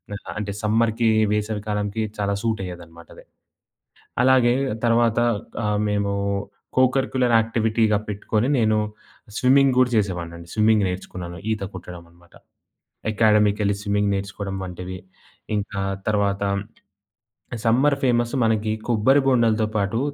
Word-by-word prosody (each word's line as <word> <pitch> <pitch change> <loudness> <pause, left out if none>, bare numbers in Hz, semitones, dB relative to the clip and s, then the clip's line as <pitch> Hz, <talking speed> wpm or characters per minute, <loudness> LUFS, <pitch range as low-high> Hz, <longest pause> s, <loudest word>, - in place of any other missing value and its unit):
ఆహ్, 100 - -10
అంటే 105 -1 -3
సమ్మర్‌కీ 115 +1 +2 0.2
వేసవి 105 0 -1
కాలంకి 105 +1 -2
చాలా 100 -1 0
సూటయ్యేదన్నమాట 90 -7 -5
అది. - - -15 1.0
అలాగే, 125 -2 +5 0.3
తర్వాత 115 -1 +3 0.5
ఆహ్, 105 0 0
మేము 100 -1 0 0.7
కో-కరిక్యులర్ 130 -1 +2
యాక్టివిటీగా 110 -1 +1
పెట్టుకొని, 105 +4 -1
నేను 110 -2 +2 0.6
స్విమ్మింగ్ 135 0 +4
కూడా 125 -1 +3
చేసేవాడినండి. 85 -4 -3
స్విమ్మింగ్ 110 -2 +3
నేర్చుకున్నాను. 90 -1 -6
ఈత 110 -2 -3
కొట్టడం 90 -1 -9
అనమాట. 85 0 -24 0.8
అకాడమీకెళ్ళి 105 -1 +3
స్విమ్మింగ్ 100 0 +1
నేర్చుకోడం 100 0 -5
వంటివి, 90 0 -7 0.6
ఇంకా 100 -1 -3 0.3
తర్వాతం 100 -1 0 1.1
సమ్మర్ 135 +5 +3
ఫేమసు 120 -1 +1
మనకి 110 -1 +1 0.2
కొబ్బరి 120 +5 +4
బొండాలతో 115 -4 +3
పాటు, 100 +3 0
105 Hz, 105 wpm, -23 LUFS, 100-115 Hz, 1.1 s, అలాగే